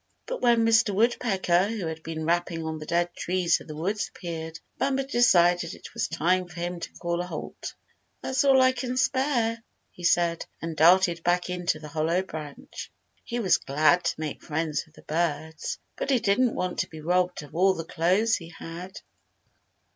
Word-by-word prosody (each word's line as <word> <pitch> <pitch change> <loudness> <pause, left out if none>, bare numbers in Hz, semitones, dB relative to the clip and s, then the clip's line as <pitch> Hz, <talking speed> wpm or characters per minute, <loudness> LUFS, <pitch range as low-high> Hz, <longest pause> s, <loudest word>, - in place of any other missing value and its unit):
But - - -5
when 235 -2 +4
Mr. 220 -3 +4
Woodpecker, 195 -5 +2
who 215 -4 -3
had 160 0 -5
been 160 0 -5
rapping 170 -1 0
on 160 0 -4
the 155 - -9
dead 175 0 0
trees 180 -1 +1
of - - -13
the 155 - -7
woods, 195 +7 -2
appeared, 165 -2 -6 0.2
Bumper 270 0 +1
decided 175 - +3
it - - -12
was - - -1
time 180 +3 +1
for 170 0 -10
him 175 0 -3
to - - -6
call 170 0 -2
a 180 - -5
halt. - - -7 0.5
"That's 265 +2 +1
all 270 -1 +6
I 255 - +5
can 255 0 -4
spare," 245 -3 +1 0.3
he 175 - -13
said, 170 -1 +2
and 165 -1 -5
darted 170 +1 +5
back 180 +1 +1
into 180 -3 -1
the 155 0 -9
hollow 160 +5 0
branch. 150 -5 -8 0.3
He 240 - -4
was 190 -6 +3
glad 155 +5 +2
to - - -1
make 155 -2 -4
friends 160 -1 -2
with 155 - -25
the - - -16
birds, 160 -1 -2 0.2
but - - -4
he 270 - +4
didn't 225 +4 +2
want 180 -1 -2
to - - -1
be 160 - -10
robbed 180 +1 0
of 145 - -14
all 190 +2 +4
the 165 - -5
clothes 185 +8 +2
he 170 -3 -10
had. 170 +3 -9
175 Hz, 190 wpm, -26 LUFS, 165-210 Hz, 0.5 s, all